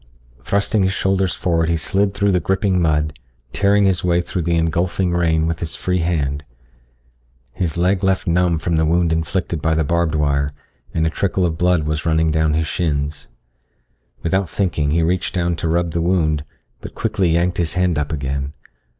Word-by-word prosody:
Thrusting 100 +1 0
his 95 0 +1
shoulders 95 -1 0
forward 85 -2 0
he 85 - +1
slid 100 +4 0
through 100 0 +2
the 90 - +2
gripping 95 +1 +1
mud, 75 -3 0 0.3
tearing 100 0 +3
his 95 -3 +1
way 85 -1 +2
through 90 +1 -3
the 85 +1 0
engulfing 85 +2 0
rain 80 -2 +2
with 85 0 -2
his 80 -2 -4
free 90 0 -1
hand. 75 -4 -1 1.1
His 85 -3 -2
leg 90 +3 +1
left 95 0 +1
numb 85 -1 +2
from 80 +1 -1
the 80 - +2
wound 85 0 +2
inflicted 80 0 -2
by 80 +1 +1
the 80 - +2
barbed 85 +1 0
wire, 70 -1 0 0.4
and 80 - 0
a 80 - 0
trickle 95 +1 0
of 80 -2 -2
blood 90 -3 +2
was 75 +1 -2
running 80 -1 +2
down 80 -1 +1
his 80 0 +1
shins. 75 -3 -2 1.0
Without 95 +1 0
thinking 80 -6 0
he 80 +3 +2
reached 90 +3 -1
down 85 -1 0
to 85 - -2
rub 85 +1 0
the 85 0 -1
wound, 80 -4 +1 0.3
but - - -10
quickly 105 -5 0
yanked 85 +2 +1
his 85 -2 0
hand 90 -3 +1
up 75 0 -3
again. 70 -1 -3
85 Hz, 185 wpm, -20 LUFS, 80-90 Hz, 1.1 s, tearing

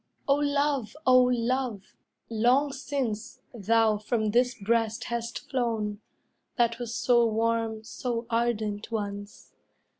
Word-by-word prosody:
O 275 - +5
love, 285 -3 0
O 255 0 +7
love, 245 -3 -1 0.3
long 245 +6 +2
since, 260 -5 -3
thou 225 -1 +2
from 215 0 -1
this 245 +2 +2
breast 225 +2 0
Hast 235 -1 -4
flown, 225 -5 -1 0.6
that 235 -1 +2
was 240 -1 -4
so 240 -1 +4
warm, 225 0 0
so 235 +1 -4
ardent, 225 -2 -1
once. 205 -2 -5
230 Hz, 115 wpm, -27 LUFS, 220-250 Hz, 0.6 s, O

